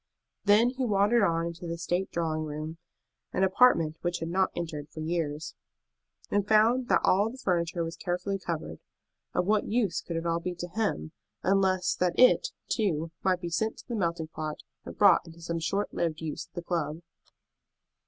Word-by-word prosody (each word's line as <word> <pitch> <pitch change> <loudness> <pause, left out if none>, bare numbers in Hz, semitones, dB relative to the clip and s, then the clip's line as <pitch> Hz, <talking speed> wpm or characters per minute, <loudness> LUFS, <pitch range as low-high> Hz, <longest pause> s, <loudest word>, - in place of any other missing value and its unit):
Then 215 +4 +5
he 260 0 -3
wandered 210 +1 +3
on 165 -3 +2
into 170 +1 -6
the 170 0 -3
state 175 +2 -1
drawing 160 -2 -1
room, 155 +2 -5 0.5
an 190 - +1
apartment 185 -6 +4
which 175 0 -1
he 165 - -4
had 165 - -5
not 190 +1 +2
entered 155 -4 -5
for 155 - -10
years, 155 -2 -2 0.8
and 205 0 +1
found 230 +4 +4
that - - +3
all 200 +4 +3
the 255 - -10
furniture 175 -6 0
was 165 +2 -5
carefully 180 +2 -2
covered. 155 - -4 0.6
Of - - +2
what 210 +1 +2
use 215 -6 +1
could 170 - -6
it 165 - -3
all 170 0 +1
be 175 +1 -4
to 175 +1 -6
him, 190 - -2 0.3
unless 190 -1 +2
that 180 -1 0
it, 255 - +6 0.2
too, 165 -7 0
might 185 -1 +1
be 175 - -3
sent 220 +6 0
to - - -14
the 240 - -3
melting 170 -5 -1
pot 155 -1 -5 0.2
and - - -9
brought 200 -3 +6
into 165 0 -13
some 170 0 -3
short 195 +5 -1
lived 160 -2 -1
use 160 -2 -5
at - - -46
the 175 - -4
club? 165 -2 -2
175 Hz, 190 wpm, -28 LUFS, 165-200 Hz, 0.8 s, it